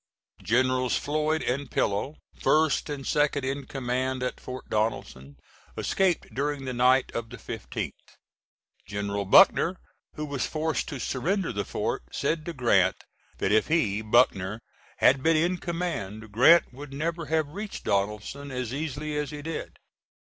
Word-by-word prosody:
Generals 130 +2 +2
Floyd 155 +2 0
and 130 +2 -2
Pillow, 105 +10 0 0.3
first 155 -1 +2
and 140 -2 -5
second 145 -2 +1
in 140 +1 -3
command 130 0 -2
at 125 - -2
Port 130 0 -8
Donelson, 70 -11 -2 0.4
escaped 190 -3 0
during 140 0 -2
the 130 - -3
night 125 +2 +3
of 115 -1 -4
the 125 - -9
15th. - - -5 1.0
General 100 0 -2
Buckner, 185 - +6 0.4
who 150 - -3
was 140 -3 -2
forced 160 0 -1
to 140 -4 -5
surrender 175 - -1
the 100 0 -2
fort, - - -2
said 155 +2 -1
to 170 - -3
Grant 125 -5 +2 0.3
that 95 - 0
if 110 +1 +3
he, 110 -11 +1
Buckner, 110 -3 +2 0.4
had 135 +1 +5
been 165 +2 +3
in 175 +3 +1
command 110 - -4
Grant 130 +8 +6
would 140 +2 -9
never 165 +2 -3
have 155 -1 +1
reached 205 +6 -6
Donelson 105 +8 -2
as 125 -2 -4
easily 150 +1 -3
as 150 -1 -1
he 145 -1 -7
did. 160 0 -5
135 Hz, 150 wpm, -27 LUFS, 120-155 Hz, 1.0 s, Buckner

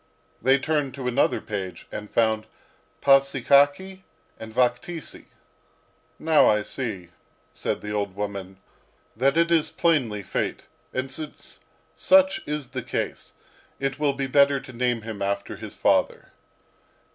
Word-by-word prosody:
They 130 +3 +5
turned 145 -2 -1
to 130 -2 -4
another 125 +3 +2
page 95 -5 -6
and 105 0 -6
found 110 -1 +1 0.6
Pavsikakhy 140 +6 +4 0.4
and 110 0 -8
Vakhtisy. 125 +7 -1 0.9
"Now 160 -1 +4
I 105 -1 +2
see," 105 -9 -5 0.4
said - - -3
the 105 - -6
old 100 -2 -2
woman, 100 -2 -5 0.6
"that 135 +6 +2
it 170 0 +3
is 165 -2 +3
plainly 130 - +1
fate. - - -3 0.3
And 130 +1 -3
since 150 +2 -8 0.3
such 285 +2 +4
is 150 -4 -3
the 130 -1 -4
case, - - -4 0.5
it 135 0 -2
will 145 -2 +2
be 135 0 -2
better 140 +1 +4
to 130 -1 -12
name 120 -1 0
him 110 -3 -7
after 100 0 -2
his - - -9
father. - - +1
130 Hz, 135 wpm, -25 LUFS, 110-145 Hz, 0.9 s, They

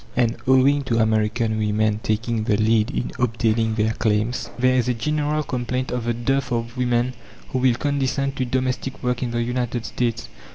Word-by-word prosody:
And, 120 -2 +2
owing 135 +2 +5
to 115 -3 0
American 110 0 +1
women 105 0 +1
taking 110 +1 -1
the 105 -2 +2
lead 110 +1 +3
in 140 - -3
obtaining 115 -2 +1
their 110 0 +1
claims, 110 +2 0
there 130 +1 +3
is 125 -1 +2
a 125 - +1
general 150 +5 0
complaint 125 0 -2
of 125 -2 -2
the 120 - +1
dearth 135 +2 -1
of 115 0 -2
women 125 0 +1 0.4
who 130 - -1
will 125 -2 +3
condescend 140 0 -1
to 130 - 0
domestic 130 +1 -2
work 125 0 0
in 125 - -1
the 120 0 -1
United 120 -1 -2
States. 120 -3 -2
120 Hz, 180 wpm, -22 LUFS, 110-130 Hz, 0.4 s, owing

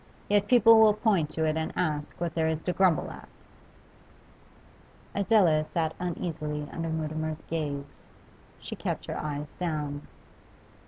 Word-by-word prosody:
Yet 205 0 +3
people 230 -2 +7
will 215 -1 +6
point 205 -8 +2
to 160 +1 -1
it 155 0 +1
and 160 0 -2
ask 150 -4 -2
what 170 -1 -2
there 160 -1 +1
is 160 -1 0
to 180 - -1
grumble 185 -5 +2
at!' - - -12 1.8
Adela 195 -7 +4
sat 160 0 -2
uneasily 155 -4 -3
under 165 0 -3
Mutimer's 155 0 -3
gaze; 145 -3 -5 0.5
she - - -7
kept - - -3
her - - -4
eyes 150 -1 -4
down. 150 -4 -3
160 Hz, 140 wpm, -28 LUFS, 150-180 Hz, 1.8 s, people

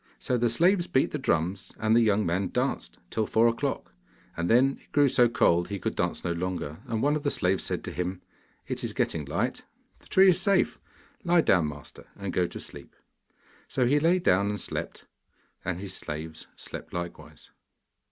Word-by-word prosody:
So 125 - -1
the 120 -1 +2
slaves 175 - +3
beat 135 - +2
the 150 - -3
drums, 90 -5 -1
and 110 0 +2
the 120 - +6
young 105 -2 +2
man 90 +3 0
danced - - -2
till 110 -1 0
four 115 +1 +4
o'clock, 115 - -2 0.4
and 85 +1 -2
then 135 +3 +4
it - - -26
grew 145 -1 +4
so 120 -2 +4
cold 85 -6 +3
he 100 - -4
could - - -3
dance - - -1
no 85 - -1
longer, 85 -3 -3
and 110 -1 -1
one 145 +1 +3
of 150 - -2
the 145 - 0
slaves 95 -6 +1
said - - -3
to - - -5
him: 90 +1 -3 0.5
'It - - -4
is - - -3
getting 75 -3 -1
light; 70 - -2 0.4
the - - -20
tree 190 0 +6
is 180 - +3
safe; 200 -2 +2 0.4
lie 175 -2 +4
down, 90 - +3
master, 75 -2 -10
and 100 -2 -5
go 90 -1 +2
to - - -8
sleep.' - - -8 0.7
So 125 - 0
he 145 +4 +3
lay 165 +4 +3
down 100 - +2
and 105 0 -3
slept, - - -5 0.6
and 90 -1 -3
his 100 -1 -5
slaves 80 +1 -6
slept - - -9
likewise. 85 0 -7
105 Hz, 195 wpm, -27 LUFS, 85-135 Hz, 0.7 s, the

